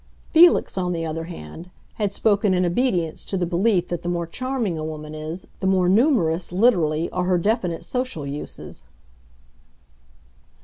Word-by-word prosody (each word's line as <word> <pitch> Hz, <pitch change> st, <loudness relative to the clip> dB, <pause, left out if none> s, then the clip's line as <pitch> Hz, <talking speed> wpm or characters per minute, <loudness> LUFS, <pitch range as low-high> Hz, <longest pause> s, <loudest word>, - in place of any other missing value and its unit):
Felix, 335 Hz, -, +5 dB
on 180 Hz, -1 st, -1 dB
the 165 Hz, -1 st, -2 dB
other 165 Hz, +1 st, -4 dB
hand, 165 Hz, -, -9 dB, 0.2 s
had 205 Hz, -3 st, -1 dB
spoken 205 Hz, -2 st, +2 dB
in 180 Hz, 0 st, +2 dB
obedience 175 Hz, -4 st, 0 dB
to 195 Hz, -, -2 dB
the 180 Hz, -, 0 dB
belief 180 Hz, +1 st, +1 dB
that 175 Hz, -1 st, -3 dB
the 175 Hz, -, -3 dB
more 170 Hz, -1 st, -1 dB
charming 250 Hz, 0 st, -2 dB
a 155 Hz, -, -4 dB
woman 155 Hz, -1 st, -6 dB
is 155 Hz, +4 st, -6 dB
the 190 Hz, -, -1 dB
more 185 Hz, -2 st, +3 dB
numerous, 185 Hz, -, +2 dB
literally, 175 Hz, -6 st, +2 dB
are 180 Hz, 0 st, -1 dB
her 180 Hz, 0 st, +2 dB
definite 180 Hz, -3 st, -1 dB
social 250 Hz, -, -3 dB
uses. 140 Hz, -, -7 dB
180 Hz, 160 wpm, -23 LUFS, 165-205 Hz, 0.2 s, Felix